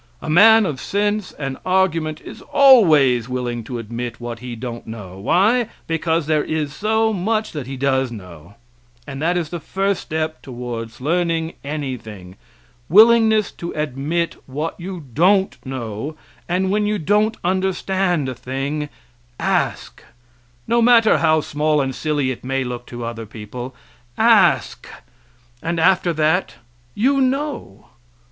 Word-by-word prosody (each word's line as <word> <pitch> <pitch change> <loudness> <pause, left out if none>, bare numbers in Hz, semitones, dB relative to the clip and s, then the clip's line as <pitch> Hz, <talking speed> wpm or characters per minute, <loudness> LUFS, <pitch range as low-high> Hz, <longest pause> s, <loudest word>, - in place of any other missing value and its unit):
A - - -4
man 220 +5 +7
of 145 -7 -3
sense 205 0 -1
and 135 -2 -5
argument 165 -5 0
is - - -11
always 155 - +5
willing 120 -2 -3
to 125 - -5
admit 115 +1 -6
what 120 -1 -6
he 125 0 -7
don't 120 0 -7
know 100 -4 -8
why? 210 - +2 0.2
because 165 0 0
there 155 -1 +1
is 155 -2 -2
so 220 +5 +1
much 215 +3 -1
that 145 -5 -6
he 135 0 -6
does 130 -1 +1
know; 90 -4 -11 0.5
and 140 0 -7
that 175 +3 +1
is 165 -3 -2
the 175 - -5
first 195 +3 -1
step 155 -1 -3
towards 120 -3 -7
learning 165 +1 0
anything 115 -11 -6 0.5
willingness 220 +2 +5
to 170 - -7
admit 150 +3 -2
what 150 +5 -3
you 180 -1 -6
don't 190 - +2
know 130 +2 -5 0.3
and 185 +2 0
when 210 0 +1
you 210 0 0
don't 210 +6 +1
understand 185 -3 0
a 130 - -3
thing, 135 +4 -4 0.5
ask - - -1 0.6
no 235 +1 +2
matter 230 -2 +5
how 160 -1 +3
small 150 +1 0
and 135 -1 -1
silly 145 -2 -1
it 125 - -8
may 135 +1 -1
look 120 -1 -6
to 120 -1 -6
other 115 -1 -6
people 120 +5 -8 0.4
ask, - - +3 0.7
and 165 +1 -2
after 175 +1 +3
that 160 +3 +1 0.4
you 270 +5 +2
know. 265 - -2
155 Hz, 140 wpm, -20 LUFS, 125-190 Hz, 0.7 s, man